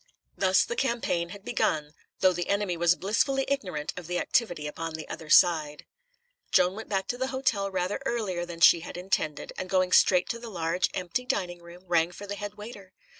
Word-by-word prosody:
Thus 190 -1 +3
the 235 - -4
campaign 235 -10 -1
had 200 +2 -11
begun, 150 -10 0 0.3
though 185 -1 +5
the 175 0 -4
enemy 200 -3 0
was 170 +1 +3
blissfully 265 +8 +1
ignorant 185 - -2
of 180 -3 -8
the 180 0 -1
activity 175 -10 0
upon 160 +2 -5
the 160 - -7
other 160 - -8
side. 155 -4 +4 0.7
Joan 180 +1 +4
went 220 +3 -8
back 195 -1 -1
to 245 - -2
the 260 - 0
hotel 235 -7 0
rather 185 +2 -2
earlier 210 -9 -2
than 170 -1 -8
she 170 - +8
had 170 - -8
intended, 170 -5 -2
and 185 - -5
going 185 -1 +2
straight 180 0 +5
to 235 - -3
the 235 0 -8
large, 175 -2 0
empty 185 +8 -2
dining 175 -6 -2
room, 170 +1 -13
rang 170 -1 +2
for 200 +3 -9
the 200 - -5
head 205 0 -6
waiter. 205 -3 -11
185 Hz, 200 wpm, -27 LUFS, 170-205 Hz, 0.7 s, she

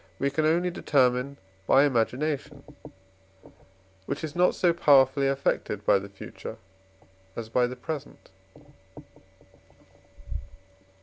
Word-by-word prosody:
we 140 0 0
can 155 +2 +1
only 175 +3 +1
determine 135 -3 +1 0.3
by 135 - +6
imagination, 140 +2 -1 1.4
which 140 +3 -4
is 155 -2 -5
not 180 +1 +3
so 175 -2 +3
powerfully 140 -4 +4
affected 135 -6 -1
by 100 - +4
the 100 +1 -9
future 100 - -9 0.8
as 115 -1 -6
by 125 +1 +2
the 125 - -6
present. 145 -1 -7
140 Hz, 105 wpm, -27 LUFS, 125-155 Hz, 1.4 s, by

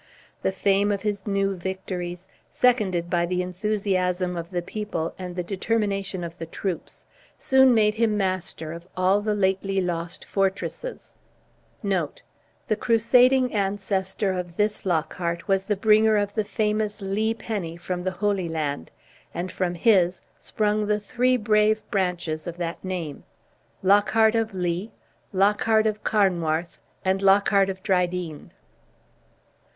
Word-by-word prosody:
The - - +1
fame 195 +2 +2
of 200 -2 -2
his 205 -2 -2
new 195 -1 +1
victories, 180 -1 -5 0.2
seconded 205 -9 +2
by 175 -1 +1
the 180 +1 0
enthusiasm 185 -2 -1
of 170 -1 -5
the 175 -2 -2
people 185 -4 -4
and 180 -1 -6
the 180 - -2
determination 195 -1 -1
of 170 +1 -7
the 165 - -5
troops, 180 +1 -5 0.3
soon 265 -1 +5
made 210 -1 +4
him 220 -1 +1
master 185 -5 -2
of 170 +1 -10
all 190 +2 +3
the 210 0 0
lately 195 0 +1
lost 170 -2 -3
fortresses. 195 - -3 0.7
The 195 - -4
crusading 250 +2 +4
ancestor 195 -1 -1
of 180 -2 -5
this 210 -1 0
Lockhart 170 0 -1
was 195 -1 +1
the 210 - 0
bringer 215 +1 +4
of 205 0 -1
the 215 -1 -1
famous 210 0 -1
Lee 215 +3 0
penny 195 -8 -4
from 180 0 -4
the 185 - 0
Holy 190 -2 -1
Land, 150 - -3 0.5
and 180 +2 -3
from 180 -2 -1
his 180 -2 +3 0.2
sprung 210 0 -1
the 210 0 +1
three 250 +4 +1
brave 215 0 +2
branches 175 -4 -1
of 175 0 -5
the 170 -1 -3
name 175 -6 -5 0.6
Lockhart 210 +3 +4
of 225 -3 -1
Lee, 180 +3 -2 0.4
Lockhart 210 +3 +3
of 215 -1 -1
Carnwarth, 175 -5 +1 0.3
and 190 +1 +1
Lockhart 195 0 +4
of 190 0 -6
Drydean. 180 -4 -1
195 Hz, 135 wpm, -25 LUFS, 180-210 Hz, 0.7 s, soon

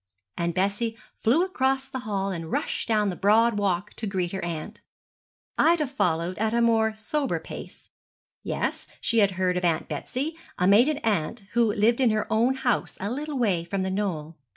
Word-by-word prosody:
and 170 0 -2
Bessie 205 +4 0 0.2
flew 260 +10 +3
across 270 -6 0
the 260 - -5
hall 195 -1 -1
and 165 -3 -5
rushed - - -2
down 210 -3 +2
the - - -5
broad 215 +3 +3
walk 195 0 -1
to 220 - -4
greet 185 -3 -1
her 190 - -4
aunt. 165 -3 -5 0.8
Ida 330 -2 +4
followed 180 - -1
at 220 +1 +1
a - - +3
more 225 -2 +3
sober 275 +6 -1
pace. - - -10 0.5
Yes, - - -3
she 230 - +2
had 200 -2 +4
heard 180 -1 +1
of 180 - -2
Aunt 165 -2 +1
Betsy 260 - -3 0.2
a 180 - +2
maiden 245 +10 +5
aunt, 210 0 0
who 235 -2 +3
lived 225 +5 +2
in 250 - +5
her 215 -1 +1
own 240 +4 +3
house 260 -2 -1
a 200 +3 -3
little 290 +2 -3
way 195 -9 +1
from 190 +3 -2
The 190 - -2
Knoll. 165 -6 -3
210 Hz, 185 wpm, -26 LUFS, 185-240 Hz, 0.8 s, maiden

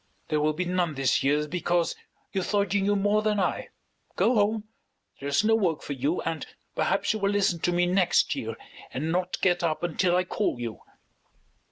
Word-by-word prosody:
There 150 -1 +1
will 155 +1 +2
be 180 +4 -2
none 175 -3 0
this 135 -2 +2
year 150 +2 +1
because 175 0 0 0.4
you 190 - 0
thought 200 0 0
you 200 - +2
knew 205 +1 +2
more 205 +1 +2
than 215 -1 +1
I. 185 - -1 0.5
Go 240 - +3
home. 215 -1 +2 0.6
There 140 - -4
is 140 +8 +2
no 225 +1 +3
work 180 -8 +1
for 145 - -4
you, 140 +6 -1
and 165 -1 -3 0.3
perhaps - - +1
you 215 - -3
will 200 -1 +1
listen 200 -4 +1
to 175 - +1
me 175 0 +2
next 180 0 +3
year - - -4 0.4
and 155 +5 -2
not 180 +1 -1
get 180 -2 +3
up 165 -1 -1
until 175 +1 +1
I 180 - +3
call 185 - -1
you." 115 -2 -5
175 Hz, 200 wpm, -27 LUFS, 155-200 Hz, 0.6 s, Go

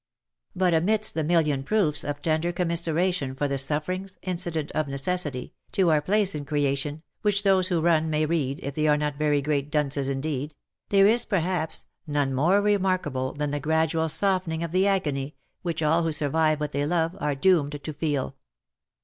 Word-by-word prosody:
But 180 -1 +2
amidst 210 +7 +1
the 160 - -1
million 150 -4 +2
proofs 155 -4 +1
of 145 0 -5
tender 160 +2 +1
commiseration 170 -4 0
for 145 +2 -1
the 140 -1 0
suffer 150 +5 0
ings, 190 +1 -6
incident 175 -4 -2
of 155 -1 -1
necessity, 140 -1 -1 0.2
to 185 -5 +3
our 150 -1 +3
place 200 +4 +1
in 150 -1 -4
creation 145 +1 -1 0.2
(which 205 -1 +2
those 190 -2 +3
who 175 -3 +1
run 160 -1 +2
may 155 0 +1
read, 150 -4 -1
if 140 - -4
they 155 +2 0
are 150 0 +4
not 150 -1 -3
very 145 -2 +1
great 145 -1 -1
dunces 140 -2 0
indeed), 145 +1 -3 0.3
there 195 -1 +5
is, 230 +4 +4
perhaps, 175 -4 -1 0.2
none 145 -2 0
more 175 +10 +3
remarkable 185 -10 0
than 145 0 -3
the 145 - -2
gradual 160 +2 +1
softening 180 -2 0
of 170 - -4
the 185 +3 +2
agony 150 -8 -1 0.3
which 165 -3 -2
all 160 +3 +3
who 165 -1 0
survive 155 +1 +1
what 150 0 -3
they 145 +1 -1
love, 165 +1 0
are 150 -4 -1
doomed 145 -2 +2
to 155 - -5
feel. 145 -3 -2
155 Hz, 185 wpm, -25 LUFS, 145-180 Hz, 0.3 s, there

